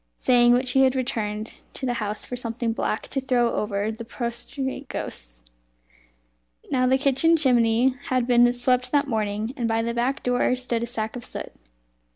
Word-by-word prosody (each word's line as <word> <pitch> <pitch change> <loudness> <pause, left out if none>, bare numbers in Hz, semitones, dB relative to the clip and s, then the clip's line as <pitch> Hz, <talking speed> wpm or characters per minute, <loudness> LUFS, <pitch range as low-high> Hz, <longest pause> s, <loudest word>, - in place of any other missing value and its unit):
Saying 240 -1 +4
which 250 +1 +2
he 265 0 +5
returned 220 -4 -3 0.2
to - - -5
the 245 - 0
house 210 0 -3
for 250 - -5
something 235 -1 -2
black 220 - -2
to 270 - -2
throw 245 -2 +1
over 210 0 -1
the 225 +1 -7
prostrate 260 +4 -4
ghosts. - - -6 1.3
Now 255 -1 +2
the 260 +1 +4
kitchen 280 +5 +3
chimney 245 -3 +3
had 255 -2 0
been 240 0 +5
swept 250 +1 +1
that 290 0 +3
morning, 215 -2 -2
and 240 -5 -1
by 225 0 0
the 235 0 -2
back 245 +3 -1
door 250 0 +2
stood 250 -2 -2
a 235 - -2
sack 220 -1 -3
of 245 - -6
soot. - - -5
245 Hz, 175 wpm, -24 LUFS, 225-255 Hz, 1.3 s, he